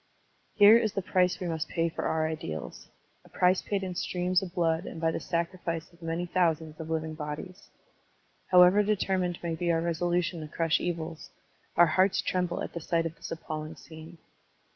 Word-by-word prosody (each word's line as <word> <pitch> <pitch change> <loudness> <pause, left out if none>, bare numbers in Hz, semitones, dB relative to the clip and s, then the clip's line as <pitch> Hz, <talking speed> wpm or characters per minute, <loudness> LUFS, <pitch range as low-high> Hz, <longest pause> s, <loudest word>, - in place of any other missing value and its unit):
Here 210 +2 +8
is 220 -3 -1
the 195 - -2
price 180 -1 +2
we 180 - -4
must 160 -1 -3
pay 165 -1 0
for 165 - -4
our 160 0 +1
ideals 80 - -6 0.2
— - - -40
a - - -19
price 180 +1 +2
paid 200 -2 -2
in 185 -1 -3
streams 180 +1 0
of 185 -2 -7
blood 165 -1 +1
and - - -7
by 165 0 +1
the - - -3
sacri 170 +2 -2
fice 165 -1 -4
of 170 - -22
many 165 +1 -2
thousands 165 -3 0
of 160 0 -6
living 160 -1 -2
bodies. 155 +5 -7 0.8
How 180 -1 +8
ever 185 +4 +5
determined 190 -4 0
may 170 -1 -1
be 170 +1 0
our 165 - +2
resolution 170 +1 -1
to 155 - -6
crush 165 +1 +1
evils, 165 -2 -4 0.5
our 175 - +8
hearts 185 +4 +2
tremble 180 -1 -1
at - - -6
the 170 - -5
sight 165 +1 0
of 165 0 -4
this - - -9
appalling 155 -1 -5
scene. 160 +1 -12
170 Hz, 200 wpm, -29 LUFS, 160-180 Hz, 0.8 s, Here